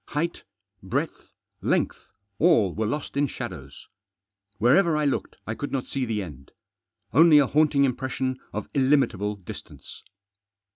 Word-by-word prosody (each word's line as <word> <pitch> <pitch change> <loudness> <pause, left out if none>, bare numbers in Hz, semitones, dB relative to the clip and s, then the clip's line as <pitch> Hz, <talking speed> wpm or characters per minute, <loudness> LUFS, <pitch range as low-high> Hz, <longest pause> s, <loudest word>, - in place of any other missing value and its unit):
Height, 165 +3 -2 0.4
breadth, - - -3 0.3
length, - - -1 0.3
all 130 - +4
were 110 0 -1
lost 145 +5 -4
in 145 +1 +2
shadows. - - -8 0.7
Wherever 150 - +4
I 150 - +1
looked 140 - -1
I 110 - -3
could 145 +5 -5
not 135 -2 -2
see 135 -2 -2
the 110 -3 -2
end. 70 -6 -12 0.6
Only 160 +3 +7
a 145 - +6
haunting 145 0 +3
impression 130 0 -1
of 105 0 -5
illimitable 130 -7 +2
distance. 95 -4 -11
135 Hz, 135 wpm, -25 LUFS, 110-150 Hz, 0.7 s, Only